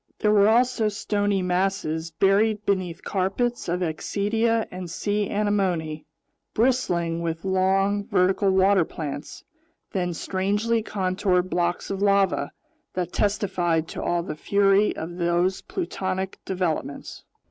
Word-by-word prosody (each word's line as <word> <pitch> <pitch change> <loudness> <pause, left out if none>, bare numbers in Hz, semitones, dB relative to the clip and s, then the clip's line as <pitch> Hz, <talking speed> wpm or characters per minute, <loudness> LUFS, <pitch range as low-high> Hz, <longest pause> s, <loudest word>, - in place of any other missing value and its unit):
There 210 -1 +4
also 240 0 +3
were - - +3
stony 205 -2 0
masses 180 -3 -1
buried 205 +5 +2
beneath 185 -4 -1
carpets 200 +4 -1
of 180 +1 -1
axidia 215 +7 0
and 180 -1 -6
sea 205 +4 -1
anemone, 185 -7 -1 0.5
bristling 175 -9 +1
with 165 +1 -3
long, 195 +2 +1
vertical 195 -1 +2
water 190 0 +4
plants, 150 -2 -6 0.5
then 180 -3 -1
strangely 205 +6 0
contoured 185 -2 0
blocks 175 +1 -1
of 195 0 -3
lava 200 -7 +2 0.4
that 180 -1 -2
testified 185 -6 0
to - - -5
all 175 -1 0
the 170 - -5
fury 200 +4 +3
of 175 +2 -6
those 175 +2 +1
plutonic 190 - -3
developments. 175 -6 -3
190 Hz, 120 wpm, -24 LUFS, 175-205 Hz, 0.5 s, There